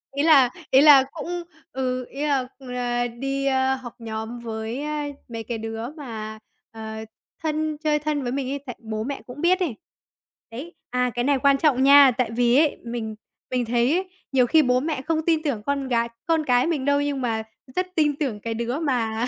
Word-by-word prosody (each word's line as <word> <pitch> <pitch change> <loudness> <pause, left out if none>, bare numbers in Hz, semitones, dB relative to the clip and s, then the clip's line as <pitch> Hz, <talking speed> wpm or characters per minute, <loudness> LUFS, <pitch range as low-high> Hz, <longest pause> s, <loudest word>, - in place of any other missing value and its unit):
Ý 285 - +1
là 285 -6 +6 0.2
ý 265 - +7
là 290 -3 +9
cũng 345 +2 -4 0.3
ừ, 255 -1 -2
ý 285 +2 -4
là 270 -3 +1
là 245 -2 -2
đi, 275 +3 -3
a, 265 -1 +2
học 250 -3 -9
nhóm 225 +1 -5
với, 225 +2 -4
a, 300 -1 -2 0.2
mấy 230 -1 -5
cái 235 +1 -4
đứa 225 +1 -5
mà, 225 -8 -7 0.3
ờ, 220 -1 -7 0.5
thân 310 -1 -1
chơi 300 -1 +1
thân 300 -1 -1
với 245 - -2
mình 265 0 -2
ấy, 280 - -2
tại 245 - -6
bố 220 -2 -4
mẹ 275 +3 -4
cũng 255 +4 -8
biết 365 +2 +3
ấy. 330 -11 -1 0.8
Đấy, 285 +10 -8 0.2
à, 250 0 +1
cái 240 - 0
này 280 +1 +2
quan 280 0 +4
trọng 270 -3 +3
nha, 280 -1 +8
tại 250 -3 0
vì 240 +1 +4
ấy 305 0 +3
mình 230 -2 -4 0.4
mình 250 -1 0
thấy 240 +2 +2
ấy 370 +1 -2 0.2
nhiều 255 -2 +4
khi 315 +6 +5
bố 250 -1 +3
mẹ 295 -1 -2
không 315 +2 -1
tin 320 -2 +2
tưởng 260 -9 -2
con 280 -1 -1
gái 235 -2 +1 0.2
con 325 -2 +2
cái 250 +1 +3
mình 300 -6 -1
đâu 285 0 +3
nhưng 285 -2 -1
mà 225 -3 -1 0.3
rất 365 0 0
tin 295 -3 +2
tưởng 260 -9 -2
cái 225 +2 -4
đứa 235 +5 -2
mà 240 -6 0
260 Hz, 210 wpm, -24 LUFS, 235-290 Hz, 0.8 s, là